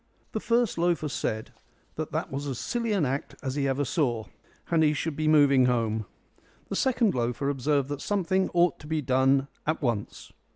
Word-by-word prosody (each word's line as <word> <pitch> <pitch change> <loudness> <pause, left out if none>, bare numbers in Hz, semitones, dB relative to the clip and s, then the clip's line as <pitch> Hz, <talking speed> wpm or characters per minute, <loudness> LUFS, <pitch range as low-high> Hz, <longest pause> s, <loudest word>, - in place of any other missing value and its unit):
The 220 - -2
first 235 -4 +1
loafer 170 -3 +1
said 110 -3 -3 0.4
that 160 +1 -3
was 140 +2 -4
as 135 -3 -3
silly 235 - -2
an 195 -7 +2
act 135 +2 -3
as 130 -1 -2
ever 140 -1 0
he - - -3
saw, 120 -5 0 0.5
and 165 -1 +4
he 150 -1 +4
should 155 +1 -2
be 155 +1 -1
moving 140 -4 +5
home. 110 -4 0 0.6
The - - -2
second 245 -5 +2
loafer 125 +2 -1
observed 140 0 +1
that 145 -1 -4
something 190 -1 0
ought 175 0 +3
to 150 - -11
be 155 -1 -1
done 135 +1 +3 0.2
at 155 - +1
once. 115 -5 -3
145 Hz, 180 wpm, -27 LUFS, 130-165 Hz, 0.6 s, moving